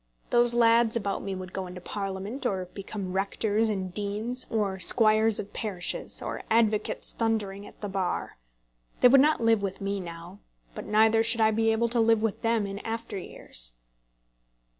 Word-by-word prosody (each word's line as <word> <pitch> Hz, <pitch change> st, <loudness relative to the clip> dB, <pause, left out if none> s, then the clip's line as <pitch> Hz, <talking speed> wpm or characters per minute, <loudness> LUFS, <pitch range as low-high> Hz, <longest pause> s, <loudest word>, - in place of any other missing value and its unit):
Those 240 Hz, 0 st, +5 dB
lads 230 Hz, -1 st, +4 dB
about 200 Hz, -3 st, -2 dB
me 195 Hz, -1 st, -4 dB
would 185 Hz, -1 st, -8 dB
go 190 Hz, -1 st, -4 dB
into 180 Hz, 0 st, -9 dB
Parliament, 195 Hz, +6 st, -5 dB
or 190 Hz, -7 st, -1 dB
become 195 Hz, -2 st, -6 dB
rectors 205 Hz, +3 st, 0 dB
and 190 Hz, -3 st, -3 dB
deans, 215 Hz, +5 st, +1 dB
or 200 Hz, -4 st, -1 dB
squires 215 Hz, +3 st, +4 dB
of 200 Hz, -, -7 dB
parishes, 190 Hz, -5 st, -2 dB
or -, -, -5 dB
advocates 220 Hz, -2 st, +1 dB
thundering 205 Hz, -3 st, -2 dB
at -, -, -17 dB
the 205 Hz, -, -3 dB
Bar. 190 Hz, -2 st, -3 dB, 0.7 s
They 250 Hz, -, +8 dB
would 270 Hz, +1 st, +7 dB
not 305 Hz, -1 st, +2 dB
live 225 Hz, -2 st, +3 dB
with 195 Hz, -1 st, -4 dB
me 200 Hz, 0 st, -3 dB
now, 170 Hz, +2 st, -9 dB, 0.3 s
but -, -, -8 dB
neither 220 Hz, +1 st, +4 dB
should 230 Hz, +1 st, +2 dB
I 220 Hz, 0 st, +4 dB
be 225 Hz, +1 st, +1 dB
able 230 Hz, +1 st, 0 dB
to 235 Hz, +1 st, 0 dB
live 225 Hz, -1 st, +3 dB
with 225 Hz, -4 st, -2 dB
them 225 Hz, -2 st, +1 dB
in 200 Hz, 0 st, -6 dB
after 225 Hz, +1 st, -5 dB
years. -, -, -3 dB
210 Hz, 175 wpm, -27 LUFS, 195-225 Hz, 0.7 s, They